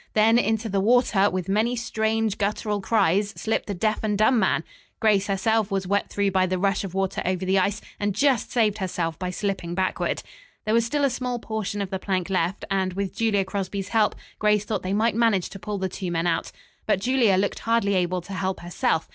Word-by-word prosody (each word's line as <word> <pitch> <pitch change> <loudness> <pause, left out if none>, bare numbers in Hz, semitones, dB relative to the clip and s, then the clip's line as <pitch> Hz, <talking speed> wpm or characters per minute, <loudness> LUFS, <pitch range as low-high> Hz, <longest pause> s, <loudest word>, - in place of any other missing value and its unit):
Then, 225 +2 +5
into 220 -1 0
the 200 -2 0
water, 210 -2 +3
with 185 -2 -3
many 220 +5 +1
strange, 220 -2 -1
guttural 210 0 -1
cries, 200 -1 +2
slipped 220 - -1
the 200 - -3
deaf 215 +4 0
and 210 -2 0
dumb 225 +3 +4
man. - - +2 0.4
Grace 205 -3 +3
herself 215 +2 +1
was 195 -2 -1
wet 200 +2 0
through 200 -1 0
by 185 0 +2
the 185 0 -1
rush 195 +3 +1
of 190 -2 -6
water 195 0 -1
over 185 0 -1
the 190 +1 +3
ice, 200 +3 0 0.2
and 205 -1 -1
just 275 -5 +2
saved 220 -3 +2
herself 170 -4 -2
by 180 -1 -2
slipping 185 -3 -3
backward. 185 0 -1 0.4
There 215 - +1
was 230 0 +3
still 290 +4 0
a 275 - +1
small 250 0 -2
portion 215 -3 -3
of 195 - -7
the 190 - -2
plank 190 -1 -2
left, 185 +1 0
and, 190 -1 0
with 195 0 -3
Julia 210 -4 +1
Crosby's 195 0 -4
help, 220 -2 +2 0.2
Grace 210 -1 +2
thought 215 - -2
they 185 - -3
might 220 +3 +2
manage 220 -5 +2
to 195 - -8
pull 205 +3 -4
the 190 -1 -1
two 185 0 -5
men 165 0 -1
out. 165 -1 0 0.4
But 210 - +2
Julia 235 -3 +3
looked 200 +1 0
hardly 230 -3 +1
able 180 -1 0
to 195 +3 -9
help 190 0 -2
herself. 170 -1 -1
200 Hz, 215 wpm, -24 LUFS, 190-220 Hz, 0.4 s, Then